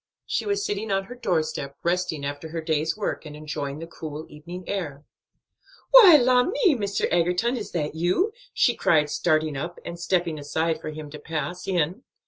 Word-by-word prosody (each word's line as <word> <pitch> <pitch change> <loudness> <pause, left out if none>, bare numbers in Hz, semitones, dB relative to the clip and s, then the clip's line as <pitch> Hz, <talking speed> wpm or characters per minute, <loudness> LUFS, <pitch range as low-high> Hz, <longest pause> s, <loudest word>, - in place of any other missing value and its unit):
She - - -2
was 405 0 0
sitting 395 - -2
on 195 0 +1
her 235 - -9
doorstep, 155 - -2
resting 170 -4 0
after 145 +3 -5
her 165 +1 -4
day's 160 +2 0
work, 210 - -2
and 150 -2 -9
enjoying 145 -2 -4
the 165 - -6
cool 155 -2 -7
evening 170 +5 -9
air. 155 -8 -4 0.9
"Why, 420 -10 +10
la 250 -1 +4
me 360 - +3
Mr. 200 -5 -1
Egerton! 180 +8 +2
is 220 -4 -5
that 150 -4 -1
you?" 180 - +1 0.2
she 240 - +3
cried, 150 -9 +2
starting 155 -2 +1
up, 170 +6 -4
and 170 0 -6
stepping 175 -3 0
aside 160 +2 -1
for - - -5
him 155 -1 -8
to 150 - -8
pass 160 +3 -4
in. 180 +3 0
170 Hz, 180 wpm, -25 LUFS, 155-200 Hz, 0.9 s, Why